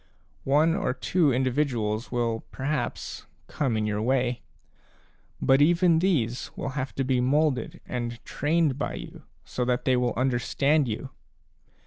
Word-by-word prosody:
One 155 +4 +4
or 200 - -1
two 165 -6 +2
in 130 +1 +1
dividuals 120 -5 -1
will 115 -2 -1
perhaps 135 -2 -3 0.2
come 130 -7 -1
in 105 - 0
your 105 0 -1
way, 125 0 0 1.0
but 135 +1 +4
even 170 +1 +4
these 130 -10 0
will - - -3
have 130 -1 -4
to 135 - 0
be 130 -1 +1
moulded 135 -1 +1
and 120 -1 -4
trained 150 -2 0
by - - -2
you - - -9 0.2
so 125 - -3
that 125 0 0
they 130 - +3
will 125 -1 0
understand 135 +3 +1
you. 115 +4 -4
130 Hz, 145 wpm, -26 LUFS, 120-150 Hz, 1.0 s, One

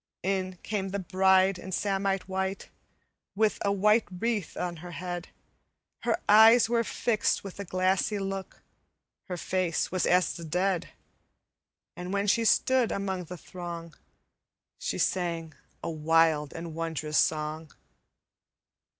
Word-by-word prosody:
"In 185 -1 -1
came 200 -3 -2
the 200 - -2
bride 190 0 +3
in 190 - -8
samite 195 0 -1
white 190 0 -3 0.7
With 215 +1 +2
a 200 - +1
white 210 +3 +3
wreath 205 0 -2
on 175 -1 -3
her 175 +3 -9
head; 175 0 -5 0.7
Her - - 0
eyes 220 +3 +8
were 235 0 +2
fixed 225 -1 0
with 195 0 -9
a 200 - -4
glassy 185 +3 +1
look, 195 -1 -5 0.6
Her 180 - -5
face 180 0 -1
was 185 -1 0
as 180 0 +3
the 170 - -8
dead, 180 +3 0 1.1
And 180 +1 -6
when 200 0 0
she 230 +3 +2
stood 255 +1 +3
among 190 -2 -2
the 180 +2 -8
throng, 170 -2 -8 0.9
She - - -3
sang 170 -3 -1 0.3
a - - -2
wild 160 -1 +2
and 165 0 -7
wondrous 155 -2 -1
song. 155 0 0
185 Hz, 135 wpm, -28 LUFS, 170-200 Hz, 1.1 s, eyes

